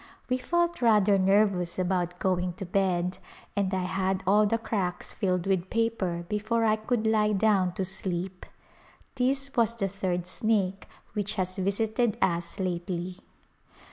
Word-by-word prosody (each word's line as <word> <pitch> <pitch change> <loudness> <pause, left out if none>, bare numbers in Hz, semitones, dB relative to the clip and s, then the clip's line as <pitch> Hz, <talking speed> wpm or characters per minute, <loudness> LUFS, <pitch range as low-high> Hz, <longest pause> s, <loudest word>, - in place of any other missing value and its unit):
We 255 0 +1
felt 345 +2 0
rather 210 -4 +4
nervous 190 -2 +2
about 180 -1 0
going 180 -1 0
to 190 +2 -6
bed, 180 -1 0 0.4
and 200 -2 +1
I 190 -1 0
had 190 +1 -1
all 210 +3 +4
the 225 - +1
cracks 200 -6 -2
filled 180 -4 0
with 190 -2 0
paper 205 -7 -1
before 215 +3 0
I 215 -1 +4
could 220 +1 -1
lie 215 -1 +3
down 195 -3 +2
to 190 - -2
sleep. 185 -1 -4 0.7
This 270 +1 0
was 230 -1 +2
the 200 -4 -1
third 185 -2 -2
snake 195 0 -1 0.3
which 210 0 -2
has 185 -1 -2
visited 220 +4 0
us 170 0 0
lately. 180 0 -3
195 Hz, 145 wpm, -28 LUFS, 180-215 Hz, 0.7 s, rather